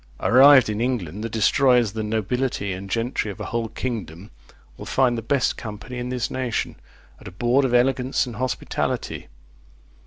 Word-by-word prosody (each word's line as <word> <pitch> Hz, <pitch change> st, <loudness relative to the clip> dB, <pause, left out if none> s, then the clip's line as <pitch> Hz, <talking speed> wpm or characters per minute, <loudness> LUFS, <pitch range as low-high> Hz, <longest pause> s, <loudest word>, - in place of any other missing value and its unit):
Arrived 130 Hz, 0 st, +7 dB
in 105 Hz, +1 st, -2 dB
England, 105 Hz, -6 st, -2 dB
the 115 Hz, -, -3 dB
destroyers 120 Hz, +2 st, +3 dB
of -, -, -13 dB
the 110 Hz, -, -3 dB
nobility 110 Hz, -1 st, -2 dB
and 95 Hz, +2 st, -8 dB
gentry 115 Hz, 0 st, -1 dB
of 100 Hz, -, -8 dB
a -, -, -5 dB
whole 115 Hz, -1 st, -2 dB
kingdom 105 Hz, -6 st, -6 dB, 0.4 s
will -, -, -10 dB
find 130 Hz, -2 st, +2 dB
the 115 Hz, -, -3 dB
best 130 Hz, +3 st, 0 dB
company 110 Hz, +3 st, -7 dB
in 125 Hz, 0 st, -4 dB
this 125 Hz, -2 st, -2 dB
nation, 130 Hz, -3 st, -2 dB, 0.4 s
at -, -, -12 dB
a -, -, -8 dB
board 120 Hz, +8 st, +1 dB
of 130 Hz, -2 st, 0 dB
elegance 130 Hz, +1 st, +2 dB
and 120 Hz, -4 st, -8 dB
hospitality. 130 Hz, 0 st, -3 dB
120 Hz, 175 wpm, -23 LUFS, 105-125 Hz, 0.4 s, Arrived